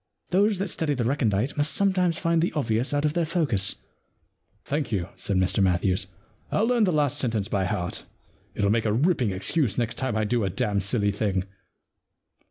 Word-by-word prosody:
Those 200 +3 +3
that 195 +1 -2
study 155 -3 -1
the 125 - -1
recondite 120 -2 0
must 145 +1 +2
sometimes 185 -4 +2
find 165 -1 +1
the 175 - +1
obvious 120 -3 0
out 145 +1 0
of 150 - +1
their 170 - +1
focus.' 140 - 0 0.5
* 105 - -44
Thank 145 -2 -2
you,' 95 -4 -1
said 100 - -1
Mr 95 +1 +2
Matthews. 90 0 +1 0.2
' 110 - -34
I'll 215 - +2
learn 235 -2 +3
the 185 - +1
last 145 -2 +1
sentence 110 -5 -1
by 100 -4 0
heart 90 -1 -3 0.3
— - - -36
it'll 100 -1 +1
make 115 0 +1
a 105 - +1
ripping 130 - +2
excuse 100 - 0
next 120 -2 -1
time 130 -4 -1
I 110 - +1
do 115 +1 0
a 95 - 0
dam' 100 +2 0
silly 100 +1 +1
thing. 100 -2 -1
120 Hz, 200 wpm, -25 LUFS, 100-155 Hz, 0.5 s, Those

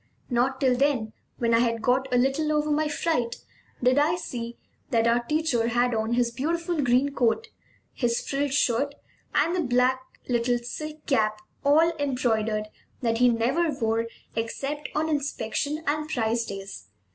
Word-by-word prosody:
Not 255 +2 +1
till 260 -2 +3
then, 250 -5 +1 0.2
when 235 -1 +1
I 230 - +5
had 230 -2 0
got 260 +3 +1
a 250 - +3
little 270 +5 +1
over 300 0 +1
my 305 +1 +2
fright, 295 -5 0 0.5
did 255 +3 +4
I 310 +4 +3
see 235 -8 -6 0.3
that 230 -1 +2
our 235 +1 +3
teacher 300 -4 +1
had 240 +1 +2
on 220 +1 0
his 240 -1 +2
beautiful 335 +6 -1
green 265 +2 +2
coat, 260 - +1 0.4
his 235 -2 0
frilled 280 0 0
shirt, 280 +1 +1 0.4
and 310 +3 +3
the - - 0
little 315 - 0 0.8
black 240 -1 +1
silk 305 +5 -7
cap, 215 -6 +2 0.3
all 320 +4 +4
embroidered, 225 -6 0 0.3
that 230 -2 0
he 250 0 +6
never 255 +9 +1
wore 230 -4 0 0.3
except 275 +6 -3
on 310 +1 +1
inspection 290 0 -2
and 305 +1 -1
prize 230 -3 0
days. 195 - -7
250 Hz, 155 wpm, -26 LUFS, 230-295 Hz, 0.8 s, he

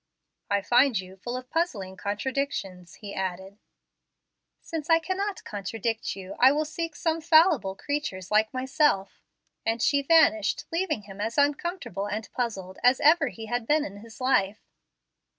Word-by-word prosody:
"I 200 -1 +1
find 245 -1 +4
you 185 0 -9
full 240 +6 -5
of 255 +1 -10
puzzling 220 - -2
contradictions," 200 -5 -3
he 205 -2 -9
added. 190 +2 -5 1.0
"Since 320 -2 -6
I 330 - +7
cannot 375 +4 -3
contradict 220 +2 -3
you, 190 -1 -8
I 260 +2 +7
will 305 +2 0
seek 330 +1 -4
some 325 +1 -1
fallible 315 - +4
creatures 215 -10 -4
like 215 +1 +3
myself"; 260 -5 0 0.4
and 225 +1 0
she 280 +4 +2
vanished, 275 -9 +3
leaving 330 - -1
him 200 0 -9
as 225 +4 -3
uncomfortable 285 - 0
and 210 0 -4
puzzled 195 -7 -4
as 250 +1 +4
ever 310 -1 +5
he 220 0 -7
had 240 0 -3
been 300 0 +3
in 200 - -8
his 225 +2 -13
life. 215 -6 0
240 Hz, 150 wpm, -27 LUFS, 200-295 Hz, 1.0 s, I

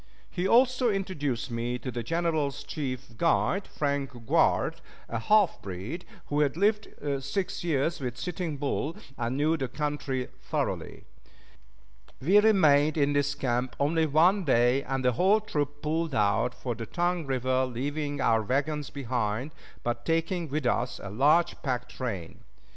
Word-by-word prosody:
He 180 +1 -1
also 250 +2 +4
introduced 145 - -2
me 120 +1 -2
to 130 +1 -5
the 120 - -3
General's 160 0 -1
chief 130 -4 -5
guide, 180 +3 +1
Frank 140 -2 -1 0.2
Grouard, - - +2 0.3
a 115 - -3
half 205 - +3
breed, 100 - -6 0.2
who 145 - -1
had 150 0 +1
lived 210 +2 +2 0.4
six 180 +8 -2
years 165 0 0
with 125 -3 -4
Sitting 165 0 -3
Bull, 145 +3 -2 0.2
and 120 +1 -2
knew 155 +3 +2
the 135 - -2
country 140 -2 -3
thoroughly. - - -3 1.2
We 185 +10 +5
remained 155 -8 +4
in 145 -1 +2
this 145 0 +1
camp 125 -2 -1
only 160 +3 +2
one 175 +7 +4
day, 125 -2 +3
and 135 -1 -3
the 125 - +5
whole 190 - +4
troop 145 -8 -3
pulled 160 0 -1
out 110 +3 +2
for 125 - -3
the 115 0 -7
Tongue 175 -2 -1
River, 130 0 +1
leaving 145 +4 -3
our 115 -1 +3
wagons 145 +6 -1
behind, 125 -1 -2 0.3
but 120 0 -2
taking 165 +2 0
with 150 0 -2
us 120 +1 0
a 95 - -7
large 150 +10 +3
pack 130 -3 -2
train. 100 -10 -5
145 Hz, 150 wpm, -28 LUFS, 125-165 Hz, 1.2 s, We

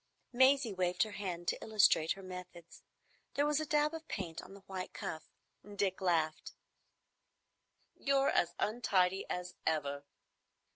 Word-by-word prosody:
Maisie 260 -2 +4
waved 180 0 +1
her 215 - -5
hand 180 -4 -5
to - - -1
illustrate 200 -7 +4
her 195 - -12
methods. 180 -2 -10 0.5
There 285 - +3
was 295 0 +2
a 310 - -3
dab 300 +1 +2
of 320 0 -7
paint 170 -5 -4
on 195 - -12
the 200 - -13
white 190 -1 -6
cuff. 160 - -5 0.5
Dick 195 -1 0
laughed. 160 -4 0 1.4
"You're 275 0 +2
as 175 - +1
untidy 195 -4 +1
as 180 0 -4
ever." 145 -3 -1
190 Hz, 140 wpm, -34 LUFS, 175-240 Hz, 1.4 s, Maisie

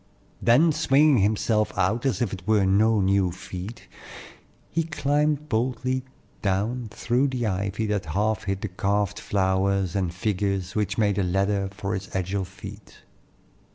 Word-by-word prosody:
Then 145 +8 +5
swinging 145 -2 +4
himself 105 +1 +1
out 120 +4 +1
as 130 -1 0
if 100 - -2
it 95 0 -8
were 105 -3 +4
no 105 +3 +3
new 95 -1 +2
feat, 90 +4 -8 0.8
he 165 - +1
climbed 150 -1 0
boldly 130 +1 -1 0.4
down 110 +5 -1
through 120 +6 0
the 125 -3 -2
ivy 100 +2 -1
that 105 -4 -1
half 105 +6 0
hid 95 0 -2
the - - -2
carved 100 +1 -1
flowers 95 -1 0
and 95 -3 0
figures 95 -1 -1
which 105 -2 -1
made 105 -2 +2
a - - +2
ladder 100 +2 0
for 100 0 -4
his 95 0 -4
agile 95 +1 -1
feet. 95 +2 -12
100 Hz, 150 wpm, -25 LUFS, 95-115 Hz, 0.8 s, Then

